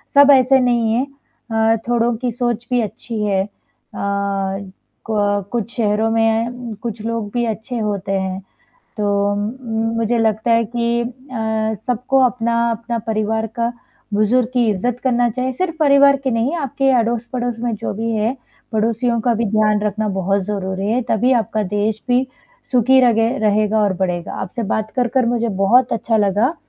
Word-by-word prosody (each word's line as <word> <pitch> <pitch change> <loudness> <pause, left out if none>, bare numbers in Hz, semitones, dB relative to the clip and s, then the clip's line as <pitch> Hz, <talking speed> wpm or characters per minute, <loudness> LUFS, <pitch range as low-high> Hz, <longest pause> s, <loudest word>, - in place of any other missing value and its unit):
सब 285 0 +8
ऐसे 265 +1 +4
नहीं 240 -3 +2
है 250 +4 +1 0.5
अ, 225 0 +3
थोड़ों 240 0 +1
की 245 +1 -2
सोच 240 -1 -2
भी 250 -1 +2
अच्छी 225 +1 -5
है। 195 -2 +1
अ, - - -8 1.6
को 220 -1 -2 0.3
कुछ 235 -1 -3
शहरों 220 -1 +1
में 225 0 +2
अ, 240 -2 -7
कुछ 230 -2 -5
लोग 230 -2 -2
भी 240 -1 0
अच्छे 230 +2 -4
होते 200 -2 -2
हैं, 190 -1 -1 0.6
तो 205 -1 +1
उम 205 - -2
उम, 225 -3 -3
मुझे 230 +1 +1
लगता 220 +1 +1
है 230 0 +4
कि 235 0 +1
अ, 235 - -2 0.8
सबको 250 +2 +1
अपना-अपना 235 -1 0
परिवार 220 0 0
का 235 0 0 0.4
बुज़ुर्ग 225 +4 +2
की 245 -2 +2
इज़्ज़त 240 +5 -2
करना 245 -2 +2
चाहिए 255 +3 -2
सिर्फ़ 330 +5 -2
परिवार 280 -2 +5
के 265 - 0
नहीं 235 +8 0
आपके 275 -2 0
अड़ोस-पड़ोस 240 +1 -2
में 240 0 -1
जो - - -4
भी 225 +3 -2
है, 220 +4 0 0.4
पड़ोसियों 230 +2 +1
का 240 +1 +2
भी 230 +1 0
ध्यान 215 -1 +2
रखना 215 +1 -1
बहुत 195 +2 +1
ज़रूरी 195 -1 -3
है 250 - +1
तभी 240 +4 +2
आपका 215 -1 -2
देश 210 +1 0
भी 250 +1 +3 0.5
सुखी 260 +1 +5
रगे 225 -1 +3
रहेगा 215 0 +2
और 200 -2 +2
बढ़ेगा। 175 -2 -3
आपसे 225 +5 -4
बात 215 0 -2
कर-कर 250 0 +1
मुझे 235 0 0
बहुत 245 +5 +4
अच्छा 230 0 0
लगा, 210 - +2
230 Hz, 165 wpm, -19 LUFS, 215-245 Hz, 1.6 s, सब